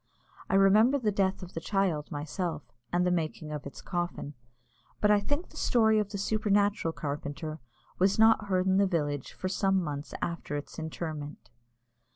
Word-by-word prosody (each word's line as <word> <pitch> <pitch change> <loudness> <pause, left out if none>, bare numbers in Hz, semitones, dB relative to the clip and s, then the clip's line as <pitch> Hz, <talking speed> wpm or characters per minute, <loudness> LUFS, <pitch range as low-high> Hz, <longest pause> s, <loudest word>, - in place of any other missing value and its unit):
I - - +2
remember 210 +7 +5
the 225 -6 0
death 195 -1 0
of 180 - -10
the - - -3
child 175 -5 0
myself, 160 +4 -3 0.3
and 180 +1 +2
the 180 - +2
making 155 -2 -2
of 150 -2 -5
its 140 - -10
coffin, 175 -5 -3 0.7
but 210 - +4
I 205 - +5
think 290 - -2
the - - -14
story 220 -2 +3
of 210 -1 -1
the 205 - -4
supernatural 205 -3 +1
carpenter 150 +1 -5 0.4
was 190 +2 +3
not 220 -1 +5
heard 185 -2 +1
in 190 0 +3
the 200 0 +4
village 145 -6 -1
for 185 - -4
some 195 0 +2
months 150 -3 -4
after 170 -3 -3
its 145 - -7
interment. 155 -3 -6
185 Hz, 175 wpm, -29 LUFS, 155-205 Hz, 0.7 s, remember